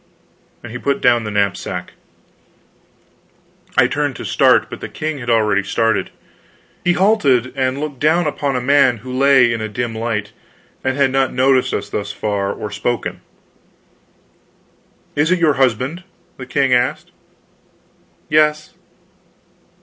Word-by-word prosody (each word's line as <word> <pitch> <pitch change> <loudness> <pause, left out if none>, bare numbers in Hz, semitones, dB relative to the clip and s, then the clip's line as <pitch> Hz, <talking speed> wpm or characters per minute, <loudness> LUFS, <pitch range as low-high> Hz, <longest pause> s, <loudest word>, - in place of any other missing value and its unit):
And 120 - -9
he 125 - -6
put 140 +1 -1
down 120 -2 +3
the - - -3
knapsack. 100 -2 -2 1.8
I - - +6
turned - - -1
to - - -7
start, - - +3
but - - -9
the - - -6
king 155 -1 -4
had 120 -1 -6
already 105 -3 +2
started. 110 +3 0 0.7
He 175 - +3
halted, 175 - +2
and 130 0 -1
looked 145 -3 -5
down 160 +3 +2
upon 145 -2 -2
a 125 - -1
man 130 -2 +3
who 125 0 -5
lay 130 -3 +4
in 115 - -3
a 110 - -3
dim 120 +2 -3
light, 110 -2 -3 0.5
and 130 0 -1
had 140 -2 +2
not 135 -1 +1
noticed 130 0 +2
us - - -3
thus 100 0 -4
far, 100 -2 -2
or 105 0 -6
spoken. 120 -1 -3 1.9
"Is 150 +3 +2
it 185 - +3
your 165 -4 +3
husband?" 130 +8 0 0.3
the 130 - -9
king 130 +1 +1
asked. 125 +1 0 1.2
"Yes." 150 0 +2
130 Hz, 140 wpm, -18 LUFS, 115-140 Hz, 1.9 s, I